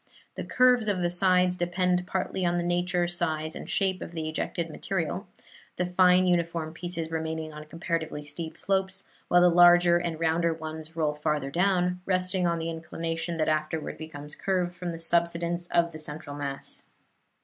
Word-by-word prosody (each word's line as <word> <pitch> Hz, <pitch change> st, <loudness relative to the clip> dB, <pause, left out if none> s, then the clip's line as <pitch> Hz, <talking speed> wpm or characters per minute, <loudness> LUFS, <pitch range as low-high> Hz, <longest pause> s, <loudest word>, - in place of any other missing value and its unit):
The -, -, -5 dB
curves 250 Hz, -3 st, +4 dB
of 195 Hz, -3 st, +1 dB
the 175 Hz, -, +1 dB
sides 180 Hz, 0 st, +4 dB
depend 180 Hz, 0 st, 0 dB
partly 190 Hz, 0 st, -2 dB
on 175 Hz, 0 st, +2 dB
the 175 Hz, -, 0 dB
nature, 175 Hz, 0 st, +1 dB
size 160 Hz, -3 st, -2 dB
and -, -, -8 dB
shape 190 Hz, -2 st, +1 dB
of 170 Hz, -, -7 dB
the 160 Hz, -2 st, -3 dB
ejected 165 Hz, +1 st, -2 dB
material, 175 Hz, +3 st, -3 dB, 0.5 s
the 180 Hz, -, +1 dB
fine 180 Hz, 0 st, +4 dB
uniform 170 Hz, -3 st, 0 dB
pieces 170 Hz, -2 st, -5 dB
remaining 160 Hz, -1 st, -3 dB
on 150 Hz, 0 st, -9 dB
comparatively 160 Hz, -2 st, -3 dB
steep 160 Hz, +2 st, -7 dB
slopes, 190 Hz, 0 st, 0 dB, 0.2 s
while 175 Hz, -, +5 dB
the 180 Hz, -, +7 dB
larger 175 Hz, 0 st, +6 dB
and 170 Hz, -2 st, -3 dB
rounder 165 Hz, 0 st, +1 dB
ones 160 Hz, 0 st, -7 dB
roll 155 Hz, -2 st, +1 dB
farther 150 Hz, -2 st, -1 dB
down, 180 Hz, +1 st, +1 dB
resting 185 Hz, -1 st, +1 dB
on 170 Hz, 0 st, +1 dB
the 165 Hz, 0 st, -3 dB
inclination 165 Hz, +1 st, -4 dB
that 155 Hz, -, +1 dB
afterward 155 Hz, 0 st, -1 dB
becomes 150 Hz, -2 st, -8 dB
curved 180 Hz, -1 st, -1 dB
from 180 Hz, -1 st, -4 dB
the 165 Hz, -, -6 dB
subsidence 170 Hz, +1 st, 0 dB
of 170 Hz, -1 st, +2 dB
the 155 Hz, -, -9 dB
central 150 Hz, -1 st, -4 dB
mass. 140 Hz, -1 st, -5 dB
170 Hz, 170 wpm, -27 LUFS, 160-180 Hz, 0.5 s, the